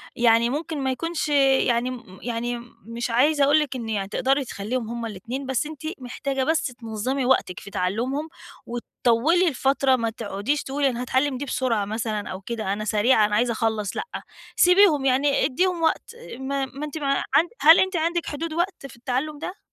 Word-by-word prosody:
يعني 235 0 +4
ممكن 310 +3 -3
ما 265 - +1
يكونش 330 +3 -2
يعني 265 -4 +3
م 230 -7 -9
يعني 240 0 -3
م 235 0 -13
مش 235 +2 -4
عايزة 280 +5 +3
اقول 290 +2 +5
لِك 295 -3 -2
إن 235 -3 -5
يعني 200 -3 -2
تقدري 270 +5 +1
تخلّيهم 225 +2 -4
هُم 235 0 -4
ال2 230 +6 -5
بس 265 +2 -1
أنتِ 310 -1 -9 0.2
محتاجة 265 +1 -3
بس 320 +3 +1
تنظّمي 245 +2 -3
وقتِك 245 -8 +1
في 200 - -11
تَعلُّمهم، 235 - -2 0.4
وتطوّلي 240 +8 +1
الفترة 270 -2 +2
ما 230 -2 -1
تقعديش 225 +5 -2
تقولي 275 +1 0
أنا 245 -1 -4
هاتعلم 260 +2 0
دي 285 - -4
بسرعة 240 -6 0
مثلًا 215 0 -3
أو 190 +1 -6
كده 220 -2 -3
أنا 215 +1 -4
سريعة 215 +2 +3
أنا 210 0 0
عايزة 240 +2 +2
اخلّص، 220 -3 -1
لأ، - - -1 0.5
سيبيهم 360 -6 +5
يعني 275 +2 +3
أدّيهم 355 +5 0
وقت 320 - 0 0.3
ما 270 0 -2
ما 280 +3 -7
أنتِ 300 +1 -6
ما 275 -2 0
عند 335 +4 +4
هل 320 +2 +8
أنتِ 375 0 +1
عندِك 340 +1 0
حدود 310 +2 -4
وقت 345 -2 -2
في - - -14
التَعلّم 260 +5 -3
ده؟ 365 +5 -6
260 Hz, 185 wpm, -24 LUFS, 230-290 Hz, 0.5 s, هل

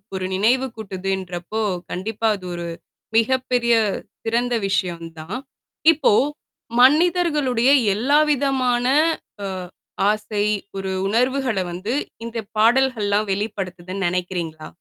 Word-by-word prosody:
ஒரு 185 -1 -2
நினைவு 245 +7 +2
கூட்டுதுன்றப்போ, 190 0 -4 0.3
கண்டிப்பா 220 +4 -2
அது 185 - -12
ஒரு 170 0 -4 0.5
மிகப்பெரிய 245 0 +2 0.5
சிறந்த 240 +2 0
விஷயம் 175 -3 -1
தான். 180 +10 -5 0.6
இப்போ 280 -8 +3 0.7
மனிதர்களுடைய, 295 -4 +4 0.3
எல்லாவிதமான 270 -1 +2 0.6
அ - - -2 0.6
ஆசை 210 -1 -1 0.3
ஒரு 190 0 -3 0.2
உணர்வுகள 250 0 +1
வந்து 195 +7 -3 0.3
இந்த 230 0 -4 0.2
பாடல்கள்லாம் 220 -3 +3
வெளிப்படுத்துதுன்னு, 190 -2 -3
நினைக்கிறீங்களா? 175 -3 -3
220 Hz, 90 wpm, -22 LUFS, 190-255 Hz, 0.7 s, மனிதர்களுடைய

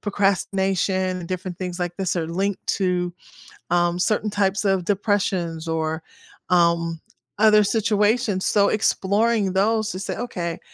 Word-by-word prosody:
procrastination 190 -2 0
and 170 - -8
different 185 -1 -5
things 180 -1 -4
like 175 -1 -3
this 185 -1 -1
are 165 -2 -1
linked 195 +4 -2
to, 180 -2 0 0.6
um, 175 0 +2
certain 215 +3 0
types 200 0 0
of 190 -3 +1
depressions 185 -5 -1
or, 160 0 -2 0.5
um, 170 -2 +2 0.4
other 215 -1 +6
situations; 210 -1 +1
so, 200 -1 +3
exploring 210 0 +1
those 215 +3 +1
to 185 - -5
say, 195 - -4
"Okay, 175 -8 -4
190 Hz, 135 wpm, -23 LUFS, 175-205 Hz, 0.6 s, other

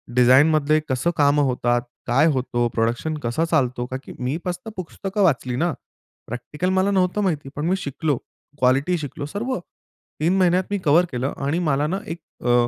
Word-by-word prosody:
डिझाईनमधले 145 +5 +5
कसं 130 +7 +1
कामं 145 0 +4
होतात? 120 -1 +1 0.3
काय 135 +6 +4
होतो? 120 -2 0
प्रोडक्शन 120 +7 0
कसं 120 +8 0
चालतो? 125 -5 +1
का 130 +1 -4
की - - -10
मी 130 +5 -1
कसं 180 +4 -4
पुस्तकं 195 +3 -2
वाचली 130 -7 +1
ना. 165 +3 +1 0.5
प्रॅक्टिकल 150 +9 -3
मला 190 +1 +2
नव्हतं 190 +1 +1
माहिती. 155 -8 -1
पण 150 +2 -2
मी 185 - +3
शिकलो. 145 -4 -1 0.4
क्वालिटी 135 +8 +3
शिकलो, 145 -1 -5
सर्व. 210 - -3 0.6
3 170 +5 +2
महिन्यात 185 0 +3
मी 205 - +1
कव्हर 165 +5 +5
केलं 130 +2 -2
आणि 160 +5 0
मला 150 -3 +1
ना 190 +4 -1
एक 165 +1 -5 0.3
अ, 120 0 +4
150 Hz, 170 wpm, -22 LUFS, 125-180 Hz, 0.6 s, डिझाईनमधले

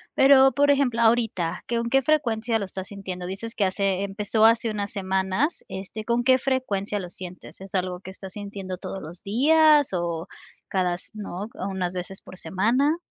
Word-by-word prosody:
pero, 270 0 +7
por 285 0 +4
ejemplo, 250 -5 +2
ahorita, 225 -7 +1
¿qué 235 - 0
con 235 0 -1
qué 270 +2 +4
frecuencia 235 -6 +1
lo 200 - -3
estás 190 0 -7
sintiendo? 190 -3 -6
Dices 225 +5 -5
que 200 - +1
hace 195 0 0
empezó 210 +2 +1
hace 230 0 +4
unas 205 -1 -3
semanas, 190 - -1
este, 195 +3 -7
¿con 235 +1 +1
qué 260 +1 +5
frecuencia 210 -7 -1
lo 180 -2 -6
sientes? 180 +1 -9
¿Es 195 0 -8
algo 180 -1 -1
que 190 - -10
estás 190 0 -10
sintiendo 200 -3 -6
todos 190 - -6
los 165 +4 -10
días 295 +6 +5
o 170 0 -2 0.4
cada 180 -2 +1
s 180 - -12
no? 200 -2 -6
¿O 190 - -5
unas 185 -2 -2
veces 185 +1 -6
por 185 - -12
semana? 255 - +1
200 Hz, 185 wpm, -25 LUFS, 185-240 Hz, 0.4 s, pero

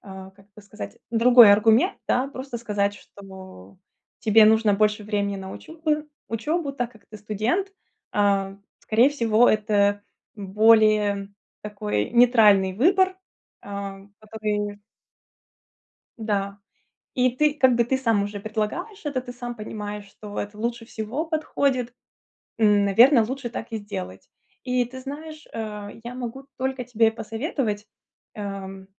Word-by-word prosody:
а, 190 -1 -10
как 195 +1 -23
это 210 - -14
сказать, 210 +1 -9
другой 235 -2 +7
аргумент, 225 - +3
да. 255 +2 +1
Просто 265 -2 -7
сказать, 205 -3 -1
что 190 - -13 0.4
тебе 220 -1 +6
нужно 220 -1 +4
больше 210 +1 +1
времени 200 -1 -1
на 190 0 -7
учебу 310 -2 -3 0.2
учебу, 280 +7 -2
так 245 -3 -4
как 220 - -20
ты 215 - -12
студент, 220 - -1 0.4
а, 195 -1 +1 0.2
скорее 235 +5 +3
всего, 235 -4 +3
это 205 -1 +2 0.3
более 210 0 +3 0.3
такой 105 - -3
нейтральный 220 -6 +5
выбор, 375 - +2 0.4
а, 200 -1 -6 0.2
одобрение. 210 -1 -4 1.4
Да. 200 -2 -2 0.6
И 255 0 +3
ты, 300 +2 +2
как 260 -4 +3
бы 235 - +3
ты 265 +3 0
сам 225 -6 +1
уже 205 0 -5
предлагаешь 220 - -4
это, 280 -3 -2
ты 245 -1 -9
сам 245 -1 -7
понимаешь, 210 -1 -6
что 205 +1 -10
это 205 +1 -6
лучше 235 +1 -3
всего 230 +7 -4
подходит. 280 -6 -1 0.7
М, 205 -2 +4
наверно, 230 +5 +6
лучше 255 +2 -4
так 225 - -6
и 225 - -2
сделать. 95 - -8 0.3
И 250 -1 0
ты 260 +2 -10
знаешь, 305 +3 -9
э, 210 -1 -7
я 240 +1 -7
могу 255 +2 -6
только 260 0 -2
тебе 225 -2 +2
посоветовать, 225 -2 -3 0.5
э, 195 -2 -7
220 Hz, 135 wpm, -24 LUFS, 205-250 Hz, 1.4 s, другой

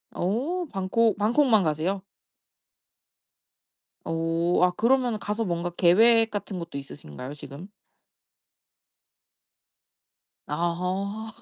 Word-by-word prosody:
오 275 - -1
방콕. 195 +3 +1
방콕만 225 0 +3
가세요? 165 +5 -1 2.0
오. 165 +2 0
아 180 - +4
그러면은 240 +3 +1
가서 210 +3 -2
뭔가 170 -1 -2
계획 225 +7 +4
같은 205 -1 -4
것도 170 -4 -7
있으신가요 130 - -9
지금? 150 +5 -10 2.8
아하. 180 +7 -2
190 Hz, 180 characters per minute, -26 LUFS, 170-225 Hz, 2.8 s, 아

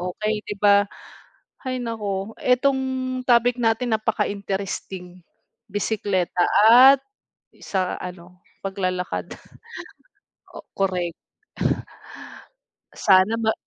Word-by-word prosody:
okey, 210 +4 -2
di 205 - -4
ba? 205 0 +4 0.8
Hay 255 -1 -2
naku, 210 -3 -4
etong 265 +2 +2 0.5
topic 245 0 +3
natin 225 -1 +1
napaka-interesting, 195 -4 -4 0.5
bisekleta 195 -3 -1 0.3
at 260 +4 +8 0.6
sa 185 -2 -1
ano, 180 0 -10 0.3
paglalakad. 185 - -3 1.2
O - - -10
korek. 180 -3 -1 1.8
Sana 195 +3 +4
ma 220 -1 +1
200 Hz, 80 wpm, -23 LUFS, 185-230 Hz, 1.8 s, at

